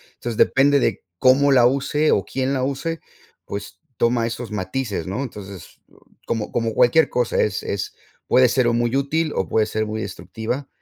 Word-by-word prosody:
Entonces, 120 -2 -5
depende 140 +1 +4
de 115 -5 -1 0.2
cómo 140 +2 +5
la 125 -3 +6
use 140 +4 +1
o 100 - +2
quién 130 +4 -2
la 130 -2 -1
use, 140 +5 -2 0.5
pues 100 0 -7 0.2
toma 120 0 +2
esos 115 0 -5
matices, 105 +3 -3
¿no? 100 +8 -3
Entonces, 100 - -10
eh, - - -28 0.3
como 110 -2 -3
como 115 -1 -1
cualquier 125 +8 +4
cosa, 125 -2 0
es 105 -1 0
es 100 -1 -3 0.3
puede 130 0 +5
ser 125 0 +2
o 120 - +2
muy 120 +1 0
útil 150 +3 0
o 95 - -1
puede 110 - +2
ser 110 0 -2
muy 110 +1 -4
destructiva, 110 +7 -5
120 Hz, 185 wpm, -22 LUFS, 110-135 Hz, 0.5 s, la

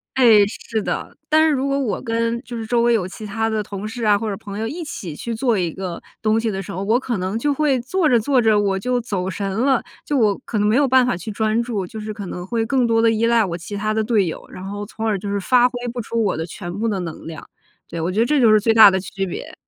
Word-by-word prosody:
哎， 225 -6 +6
是 220 +1 -4
的。 - - -4
但 315 +1 +5
是 - - +3
如 265 +1 -1
果 275 0 0
我 225 -8 -1
跟 230 +1 -1
就 240 - -8
是 225 -1 -5
周 235 0 +2
围 240 0 +4
有 190 -6 +1
其 215 +3 -9
他 225 +2 -1
的 215 -1 -1
同 200 +1 -6
事 230 +1 -6
啊 205 -1 +5
或 220 +1 -3
者 195 - -3
朋 200 +1 -7
友， 225 - -2
一 325 +8 -5
起 175 - -7
去 235 +7 -5
做 230 -1 +1
一 175 -3 -1
个 185 -1 -5 0.2
东 215 0 +2
西 225 -1 -1
的 195 -1 -3
时 - - -8
候， 190 +3 -4
我 225 +5 +2
可 245 -4 -3
能 190 +4 -2
就 290 +5 +1
会 280 -2 +1
做 335 +7 0
着 245 -5 +4
做 260 +4 +2
着 220 -2 +4
我 195 -2 +1
就 245 +5 -1
走 195 -5 -3
神 195 +1 -3
了， 250 +5 +1 0.2
就 290 - -1
我 210 -5 +3
可 215 - -2
能 210 - +2
没 215 - +3
有 280 +1 +4
办 260 0 +5
法 245 - 0
去 180 +5 -6
专 220 +2 0
注， 210 -6 -3
就 220 +2 -8
是 215 0 -5
可 200 -3 -7
能 180 0 -6
会 225 +3 -1
更 255 0 +1
多 225 -1 +2
地 230 - +4
依 225 +1 +1
赖 230 -1 +4
我 175 -3 -3
其 180 +4 -7
他 215 +1 -1
的 220 - 0
队 215 -5 +2
友， 160 - -6
然 185 - -9
后 205 +2 -5
从而 220 0 -2
就 200 +2 -7
是 200 - 0
发 245 +5 +4
挥 250 - -11 0.2
不 245 - -6
出 230 +1 -2
我 195 -6 0
的 160 - -3
全 175 +1 -7
部 230 - 0
的 200 -3 -1
能 170 -3 -6
量。 160 -2 -9 0.4
对， 170 - -5
我 170 +3 -1
觉 205 - -1
得 230 - +4
这 300 -1 +2
就 230 -4 +5
是 215 - +6
最 225 +2 +2
大 220 -3 +9
的 190 - 0
区 195 +1 -4
别。 180 - -7
220 Hz, 320 characters per minute, -21 LUFS, 195-235 Hz, 0.4 s, 大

